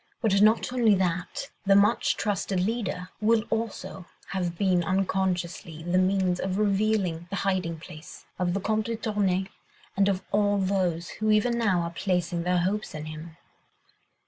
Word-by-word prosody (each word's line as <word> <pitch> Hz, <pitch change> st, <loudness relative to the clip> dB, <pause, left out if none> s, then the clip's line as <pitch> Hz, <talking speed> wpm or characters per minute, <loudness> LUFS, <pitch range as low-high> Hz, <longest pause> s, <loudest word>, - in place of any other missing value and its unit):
But 200 Hz, -3 st, +3 dB
not 220 Hz, +3 st, +4 dB
only 230 Hz, -5 st, +4 dB
that, 185 Hz, +8 st, -2 dB
the 195 Hz, -1 st, +4 dB
much 205 Hz, +4 st, +3 dB
trusted 200 Hz, -2 st, -1 dB
leader 185 Hz, -2 st, -2 dB
will 220 Hz, 0 st, +3 dB
also 220 Hz, -5 st, -4 dB, 0.2 s
have 175 Hz, -3 st, -2 dB
been 185 Hz, -2 st, +2 dB
unconsciously 180 Hz, -3 st, -1 dB
the 175 Hz, +2 st, +1 dB
means 185 Hz, -1 st, +1 dB
of 190 Hz, 0 st, -2 dB
revealing 200 Hz, -5 st, +1 dB
the 200 Hz, -, -3 dB
hiding 185 Hz, -4 st, -1 dB
place 160 Hz, -1 st, -12 dB
of 180 Hz, 0 st, 0 dB
the -, -, 0 dB
Comte 215 Hz, +2 st, -1 dB
de 230 Hz, -, -1 dB
Tournay 200 Hz, -4 st, 0 dB, 0.5 s
and 200 Hz, 0 st, +3 dB
of 190 Hz, -1 st, -1 dB
all 205 Hz, 0 st, +2 dB
those 185 Hz, -3 st, 0 dB
who, 215 Hz, -, +1 dB
even 215 Hz, +3 st, +3 dB
now, 200 Hz, -7 st, +2 dB
are 170 Hz, 0 st, -3 dB
placing 175 Hz, -1 st, -1 dB
their 180 Hz, +1 st, +1 dB
hopes 195 Hz, +3 st, -1 dB
in 155 Hz, 0 st, -5 dB
him." 155 Hz, +1 st, -9 dB
190 Hz, 160 wpm, -27 LUFS, 175-210 Hz, 0.5 s, not